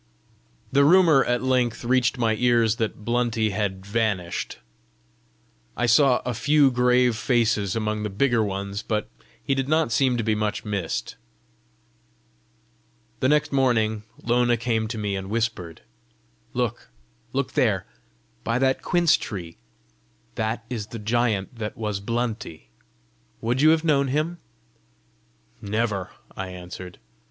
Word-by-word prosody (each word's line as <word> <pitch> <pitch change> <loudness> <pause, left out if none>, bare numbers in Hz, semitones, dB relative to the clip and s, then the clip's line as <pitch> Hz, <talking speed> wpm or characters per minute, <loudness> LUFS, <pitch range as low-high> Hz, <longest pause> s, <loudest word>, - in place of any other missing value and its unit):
The 140 +1 +4
rumour 160 -3 +6
at 120 +1 0
length 125 -3 +1
reached 130 +1 +2
my 115 -2 +2
ears 115 -1 +2
that 110 -2 -3
Blunty 120 -2 +1
had 100 -2 -3
vanished. 100 -5 -2 1.2
I 120 - +1
saw 125 +2 +4
a 125 - -1
few 145 +3 +3
grave 125 -1 +3
faces 110 -4 +1
among 110 -1 -1
the 105 - -2
bigger 120 +3 +2
ones, 100 0 -3
but 105 -3 -2 0.4
he 135 - 0
did 135 0 -1
not 155 -5 +2
seem 125 +2 +2
to 115 - -1
be 110 0 +1
much 105 +1 -2
missed. 95 -12 -3 2.0
The 130 - +2
next 150 0 +2
morning 115 -6 +2 0.2
Lona 120 0 +2
came 110 -1 -1
to 115 +1 -5
me 105 -2 -2
and 95 0 -5
whispered, 110 -7 -2 0.7
"Look! - - -2 0.4
look - - -1
there - - +1 0.6
by 115 +1 0
that 130 0 +1
quince 175 -3 +3
tree: 85 - -7 0.8
that 110 +1 -2
is 115 -5 -4
the 115 +1 -7
giant 110 0 -1
that 105 -1 -4
was 105 -3 -2
Blunty! 115 -5 -4 0.7
Would 120 +4 0
you 155 - +6
have 160 0 +3
known 140 -4 +2
him?" 155 +6 -1 1.2
"Never," 105 -3 -1 0.3
I 95 - -4
answered. 90 0 -9
115 Hz, 135 wpm, -24 LUFS, 105-125 Hz, 2.0 s, rumour